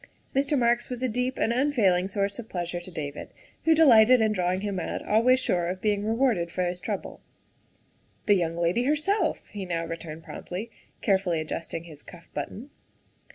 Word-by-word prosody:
Mr. 280 +2 +2
Marks 240 -1 +2
was 250 0 -4
a - - +3
deep 250 +2 -1
and 230 - +1
unfailing 225 -9 +2
source 200 +1 -2
of 225 - -8
pleas 175 -1 -4
ure 175 - -3
to 175 - -11
David 150 -4 -6 0.4
who 325 0 +5
delighted 250 -5 +7
in 220 -1 +3
drawing 185 -1 0
him 200 -2 -2
out, - - -4
always 245 +4 +4
sure 175 -8 0
of 185 +1 -3
being 205 0 0
rewarded 225 -6 +1
for 180 +2 -2
this 180 0 -2
trouble. - - -5 0.5
" - - -38
The 210 - +5
young 170 -3 0
lady 175 +8 +1
herself," 315 +5 +1
he 205 -2 -5
now 170 -2 -2
returned 165 -1 -7
promptly, 205 +6 -7 0.3
carefully 190 -5 +2
adjusting 165 +1 -4
his 155 -4 -12
cuff 170 -1 -14
button. 260 +7 -6
200 Hz, 185 wpm, -27 LUFS, 175-245 Hz, 0.5 s, delighted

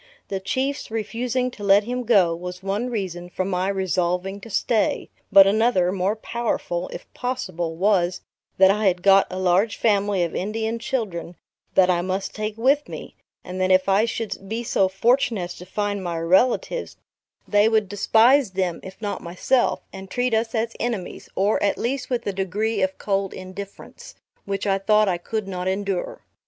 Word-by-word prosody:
The 195 - -2
Chiefs 270 +8 -2
refusing 240 +3 -2
to 210 - -10
let 200 +1 +5
him 250 +2 -3
go, 190 -8 +4
was 180 +2 -7
one 205 +6 -1
reason 180 -6 -4
for 185 +1 -2
my 185 0 -1
resolving 190 0 -1
to 230 - -10
stay; 220 +1 0 0.2
but 195 -1 +9
another, 200 -3 +3
more 190 +2 0
powerful, 220 -6 -3
if - - -8
possible, 185 -10 -3
was, 180 -1 +1 0.4
that 190 0 +7
I 210 0 +1
had 180 -1 +1
got 195 0 +6
a 185 - -5
large 185 +4 +2
family 205 -3 +2
of 170 - -3
Indian 220 +4 -2
children, 200 -9 -3 0.4
that 185 -1 +5
I 175 -1 +1
must 190 +2 -3
take 215 0 -4
with 275 +5 +2
me; - - -8 0.3
and 185 0 -5
that 185 - +2
if 185 0 +4
I 200 +3 +4
should 225 -4 -5
be 230 +2 -2
so 195 -4 +2
fortunate 225 +1 +1
as 175 0 -6
to 180 - -11
find 205 0 -2
my 170 -2 -3
relatives, 190 - +1 0.5
they 205 +1 +4
would 220 -2 +2
despise 225 +6 +4
them, 185 -3 -1
if 190 0 -11
not 205 - -3
myself; 185 +9 0
and 190 0 -9
treat 245 +3 0
us 225 +1 0
as 230 +1 -1
enemies; 225 -7 -4
or, 200 +3 +2
at 200 - +1
least 255 +1 -2
with 245 -2 -2
a 200 - -1
degree 200 +4 -1
of 285 0 0
cold 195 -1 -1
indifference, 200 - -10 0.3
which 195 0 -3
I 195 -1 +1
thought 210 +1 +3
I 180 -2 0
could 215 +2 -4
not 185 -1 -4
endure. 195 -1 -2
200 Hz, 180 wpm, -23 LUFS, 185-225 Hz, 0.5 s, but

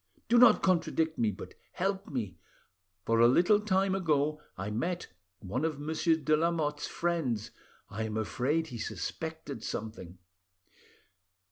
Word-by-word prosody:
Do 240 +1 +5
not 235 -3 +7
contradict 165 -3 +1
me, 115 - +3
but 100 - -8 0.2
help 195 +1 -1
me; 115 -9 -4 0.7
for 115 0 +2
a 120 - +7
little 180 - +5
time 195 -2 +1
ago 150 -5 +1 0.2
I 95 +2 -4
met 170 +11 -2 0.3
one 105 +9 -3
of 155 -3 -1
Monsieur 160 +2 +1
de 155 -1 +2
Lamotte's 155 -2 0
friends, 130 -11 -1 0.4
I 110 +2 -4
am 110 0 -3
afraid 140 +9 0
he 120 - -7
suspected 130 - -5
something. 105 -5 -6
150 Hz, 135 wpm, -30 LUFS, 115-170 Hz, 0.7 s, not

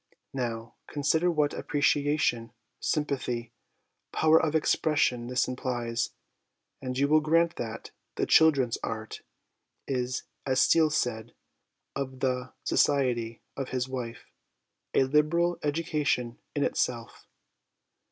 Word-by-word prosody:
Now, 115 -3 -3
consider 160 +4 +1
what 150 -3 +1
appreciation, 145 -5 +1 0.3
sympathy, 125 -6 -2 0.6
power 160 +1 +4
of 160 -1 0
expression 145 -6 +2
this 125 0 +1
implies, 120 -2 -2 0.7
and 130 -1 -4
you 140 +1 +3
will 155 +2 +5
grant 165 +2 +2
that 115 -1 -6
' - - -51
The - - 0
Children's 140 -7 +4
Art 110 -1 -5 0.3
' - - -53 0.3
is, 125 -1 -2 0.2
as 130 -1 +1
Steele 160 +2 +5
said 120 -6 -2 0.6
of 130 -1 -4
the 130 -1 -1
society 120 -5 +1
of 135 -2 -4
his 130 0 -1
wife, 125 -3 -6 0.4
" - - -55
a - - +5
liberal 155 +5 +2
education 145 -6 -1 0.2
in - - +1
itself." - - -2
130 Hz, 120 wpm, -28 LUFS, 120-150 Hz, 0.7 s, will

